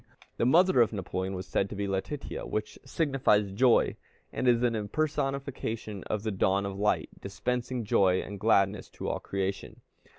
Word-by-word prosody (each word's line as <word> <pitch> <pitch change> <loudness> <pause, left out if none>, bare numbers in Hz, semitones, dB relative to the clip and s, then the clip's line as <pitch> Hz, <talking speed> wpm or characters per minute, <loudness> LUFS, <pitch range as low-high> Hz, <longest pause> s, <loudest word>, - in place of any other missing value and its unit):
The 115 - +2
mother 175 0 +5
of 115 - +3
Napoleon 95 -2 -3
was 90 0 -5
said 95 +2 0
to - - -6
be 100 0 -2
Letitia, 95 +9 -4
which 110 0 -4
signifies 130 -8 +1
joy, 120 +4 +3 0.4
and 130 - -1
is 120 0 +4
an 120 -1 +2
impersonification 130 -3 -2
of 105 -1 -2
the 110 - -1
dawn 95 0 +1
of 100 -1 -4
light 105 +2 0
dispensing 125 0 -3
joy 95 -2 +3
and 100 -1 -6
gladness 100 -1 +2
to - - -6
all - - -1
creation. 95 0 -4
105 Hz, 165 wpm, -29 LUFS, 100-125 Hz, 0.4 s, mother